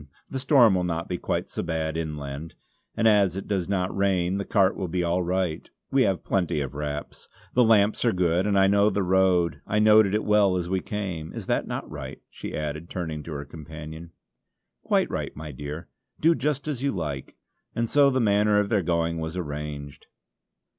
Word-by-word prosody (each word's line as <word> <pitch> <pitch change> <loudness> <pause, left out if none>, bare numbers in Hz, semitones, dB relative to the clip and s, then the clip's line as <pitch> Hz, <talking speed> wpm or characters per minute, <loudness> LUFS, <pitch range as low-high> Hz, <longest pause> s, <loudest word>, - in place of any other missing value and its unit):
The 135 - -2
storm 130 -5 +5
will 90 -1 +1
not 85 -1 -2
be 90 -1 -3
quite - - -2
so - - -4
bad 80 -2 -2
inland, 75 -1 -5 0.4
and 115 - +3
as 100 -4 +4
it 95 - -5
does 95 -3 -1
not 95 -2 -1
rain 95 -1 +1
the 100 - -3
cart 95 -3 +3
will 95 - -3
be 90 +1 -1
all 85 +2 +1
right; 90 -2 -2 0.2
we 135 - +3
have 95 -7 +1
plenty 90 -5 0
of 70 -2 -4
wraps. 75 0 -6 0.2
The 125 - +5
lamps 110 -2 +4
are 120 - +3
good, 90 0 +1
and 100 -1 +2
I 95 - +6
know 100 +1 +4
the 100 -2 0
road; 90 -3 +2
I 105 - 0
noted 105 -1 +5
it 110 - 0
well 105 -3 +3
as 85 -1 -2
we 95 - +1
came. 90 -7 -5
Is - - -7
not - - 0
that - - -4
right?" 70 -3 -8
she - - -6
added, 75 +2 -4
turning 80 -4 -4
to 80 +1 -7
her 70 -1 -5
companion. 80 +1 -9 0.7
"Quite - - +1
right, - - -4
my 75 0 -7
dear! 75 +4 -7 0.3
Do 165 +2 +5
just 150 -2 -2
as 140 -5 -3
you 140 0 +1
like," 75 -7 -5 0.4
and 115 0 0
so 140 +3 +5
the 130 -1 +1
manner 105 -2 +3
of 105 -1 0
their 105 -4 +2
going 85 -1 0
was 80 +2 -4
arranged. 75 -3 -6
90 Hz, 200 wpm, -26 LUFS, 80-105 Hz, 0.7 s, I